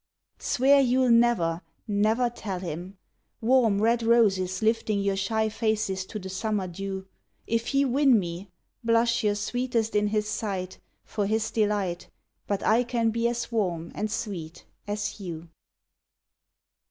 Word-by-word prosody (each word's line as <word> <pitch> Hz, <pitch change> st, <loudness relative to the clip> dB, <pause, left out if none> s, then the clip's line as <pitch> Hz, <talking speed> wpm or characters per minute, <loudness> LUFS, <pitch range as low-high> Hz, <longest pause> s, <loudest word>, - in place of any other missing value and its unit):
Swear 275 Hz, +3 st, +4 dB
you 260 Hz, 0 st, +3 dB
'll 250 Hz, -, +3 dB
never, 230 Hz, -8 st, +3 dB, 0.3 s
never 215 Hz, +4 st, +2 dB
tell 215 Hz, -5 st, -5 dB
him! 180 Hz, +2 st, -6 dB, 0.4 s
Warm, 230 Hz, -4 st, +3 dB
red 230 Hz, +2 st, +2 dB
roses 200 Hz, -5 st, +2 dB
lifting 220 Hz, -2 st, +1 dB
your 200 Hz, 0 st, 0 dB
shy 220 Hz, +3 st, 0 dB
faces 215 Hz, -4 st, -1 dB
to 215 Hz, -, -6 dB
the 190 Hz, -2 st, -7 dB
summer 195 Hz, 0 st, -2 dB
dew; 190 Hz, +2 st, -5 dB, 0.4 s
If 230 Hz, +1 st, -1 dB
he 280 Hz, 0 st, +2 dB
win 270 Hz, -1 st, +4 dB
me, 180 Hz, 0 st, -4 dB, 0.3 s
Blush 230 Hz, 0 st, +2 dB
your 205 Hz, -1 st, +2 dB
sweetest 230 Hz, +1 st, -1 dB
in 210 Hz, 0 st, +3 dB
his 210 Hz, 0 st, 0 dB
sight 195 Hz, -4 st, -3 dB, 0.3 s
For 205 Hz, -2 st, -2 dB
his 220 Hz, +1 st, 0 dB
delight, 205 Hz, -5 st, -1 dB, 0.4 s
But 200 Hz, -1 st, -1 dB
I 230 Hz, +3 st, +4 dB
can 235 Hz, -2 st, 0 dB
be 230 Hz, +1 st, +1 dB
as 235 Hz, 0 st, -3 dB
warm 175 Hz, -7 st, -1 dB
and 215 Hz, -, -2 dB
sweet 180 Hz, -8 st, -5 dB, 0.2 s
as 205 Hz, +1 st, -3 dB
you. 170 Hz, -3 st, -7 dB
215 Hz, 145 wpm, -27 LUFS, 195-230 Hz, 0.4 s, Swear